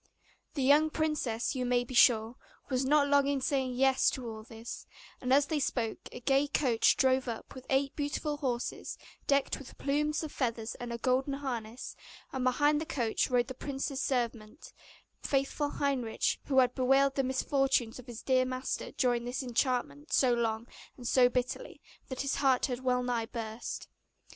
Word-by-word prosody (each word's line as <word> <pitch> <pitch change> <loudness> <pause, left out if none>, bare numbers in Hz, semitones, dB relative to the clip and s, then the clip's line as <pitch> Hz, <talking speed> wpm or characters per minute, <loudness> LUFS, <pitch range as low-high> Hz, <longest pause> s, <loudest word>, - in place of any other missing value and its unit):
The 275 - 0
young 295 +4 +5
princess, 300 -8 -1
you 255 -2 -2
may 245 0 +2
be 245 - -9
sure, 235 -1 +5 0.4
was 255 0 +1
not 285 +1 +4
long 280 -1 +4
in 280 -1 +1
saying 260 -2 0
'Yes' 265 +1 +4
to 255 -3 -5
all 220 -1 -6
this; 225 +1 -9 0.3
and 255 - -2
as 280 +2 +5
they 310 0 -1
spoke 235 -5 -2
a - - -8
gay 275 +3 +2
coach 255 -5 +3
drove 260 -1 +3
up, 230 -2 -6
with 260 -1 -11
eight 275 +1 +1
beautiful 295 0 -2
horses, 255 -4 -3 0.3
decked 280 -1 +2
with 275 - -12
plumes 300 +3 0
of 310 - -5
feathers 230 -3 -2
and 240 -1 -5
a 235 - -3
golden 260 +3 +1
harness; 245 -4 -5 0.4
and 260 -1 -2
behind 290 +4 +3
the - - -3
coach 235 -5 0
rode 245 -1 +3
the 260 - -5
prince's 275 +1 -4
servant, 235 0 -3 0.5
faithful 275 +1 0
Heinrich, 265 -6 0
who 270 - 0
had 250 -1 +5
bewailed 270 +2 +3
the 275 - 0
misfortunes 260 -2 +1
of 250 - -12
his 235 -2 -8
dear 260 -1 +3
master 255 0 -3
during 245 -1 +1
his 250 +2 -3
enchantment 255 +4 -1
so 255 -2 +4
long 230 -1 -1 0.3
and 245 -2 -6
so 250 0 +5
bitterly, 255 - -3 0.3
that 260 - -4
his 275 0 -1
heart 265 -3 +3
had 250 -3 -3
well 250 -1 +1
nigh 240 -2 -1
burst. 225 -1 -5
260 Hz, 175 wpm, -31 LUFS, 245-275 Hz, 0.5 s, young